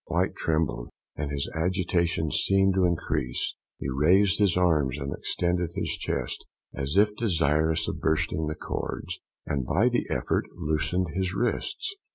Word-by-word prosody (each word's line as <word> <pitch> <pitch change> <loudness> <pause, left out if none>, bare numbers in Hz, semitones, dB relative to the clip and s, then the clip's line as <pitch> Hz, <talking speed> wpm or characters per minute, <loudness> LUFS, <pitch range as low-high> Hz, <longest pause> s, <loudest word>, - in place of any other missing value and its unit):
White - - +1
trembled, 75 -7 -1 0.3
and 75 -1 -3
his 70 -1 -2
agitation 85 -2 0
seemed 95 +4 +3
to 95 -1 +3
increase; 80 -7 -1 0.2
he - - -4
raised 90 +9 +4
his 100 -4 +3
arms, 75 -7 +2
and 70 -1 -3
extended 90 -1 -1
his - - -1
chest, - - -3 0.3
as 70 +7 -2
if 105 +1 +4
desirous 80 -6 +1
of - - -3
bursting 80 0 +1
the 75 - -2
cords, - - -4 0.3
and 70 -2 -1
by 95 - +3
the 120 - 0
effort - - 0
loosened 80 +4 0
his 95 +1 -1
wrists. 120 - -1
85 Hz, 150 wpm, -27 LUFS, 75-95 Hz, 0.3 s, raised